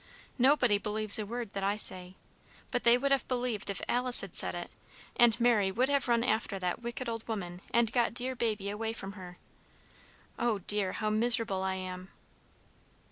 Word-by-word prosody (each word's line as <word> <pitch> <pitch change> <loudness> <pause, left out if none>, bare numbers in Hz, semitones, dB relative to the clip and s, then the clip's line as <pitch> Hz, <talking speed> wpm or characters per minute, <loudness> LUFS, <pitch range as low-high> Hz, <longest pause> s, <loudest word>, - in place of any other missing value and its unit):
"Nobody 245 -5 +4
believes 215 0 +1
a 210 - -4
word 235 -1 -5
that 195 - -3
I 200 +1 0
say. 185 -3 +2 0.6
But 245 - 0
they 235 +1 +6
would 275 +2 -1
have 275 -2 +1
believed 245 -5 -2
if 195 - -4
Alice 250 0 +2
had - - -9
said - - +4
it, - - -6 0.4
and 240 -2 +4
Mary 225 -5 +3
would 250 +7 +1
have 280 -1 +1
run 235 -1 +2
after 220 -4 -1
that 180 +4 -3
wicked 240 +1 -5
old 230 -1 -5
woman, 180 -5 -5
and 235 -1 +2
got 240 -2 +1
dear 255 +2 -1
baby 215 -4 -2
away 220 +2 -3
from 195 -3 -7
her. 180 -3 -11 1.0
Oh 235 -3 +1
dear, 200 0 -1
how 215 -1 -2
miserable 225 -3 +1
I 190 0 -1
am!" 185 0 -7
220 Hz, 185 wpm, -30 LUFS, 195-240 Hz, 1.0 s, they